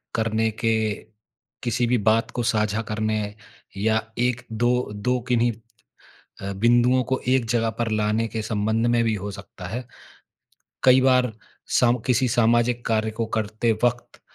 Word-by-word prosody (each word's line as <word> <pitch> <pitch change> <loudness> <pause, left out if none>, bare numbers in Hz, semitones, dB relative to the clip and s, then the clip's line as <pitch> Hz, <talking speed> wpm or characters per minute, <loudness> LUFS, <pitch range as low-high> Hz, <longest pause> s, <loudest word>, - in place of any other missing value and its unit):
करने 110 0 +1
के 110 -2 +2 0.7
किसी 120 0 0
भी 125 - +2
बात 115 +1 +1
को 120 - -3
साझा 110 -1 +1
करने 110 0 -1 0.6
या 110 +2 +1 0.2
1-2 120 0 0
2 125 +5 -1
किन्हीं 120 -1 +3 0.9
अ, 100 +1 -4
बिंदुओं 120 +4 +3
को 130 - +2
एक 130 -2 +2
जगह 115 -1 +1
पर 115 -1 0
लाने 110 +1 +1
के 110 0 -4
संबंध 110 +2 0
में 120 0 +3
भी 115 - +1
हो 100 +1 -5
सकता 95 -2 -10
है। 120 +5 -5 1.0
कई 130 0 +7
बार 125 -2 +3 0.5
सम 125 0 +3
किसी 125 0 +2
सामाजिक 120 +1 +2
कार्य 110 -1 +1
को 115 - 0
करते 110 +2 0
वक़्त 120 0 -1
115 Hz, 145 wpm, -23 LUFS, 110-120 Hz, 1.0 s, कई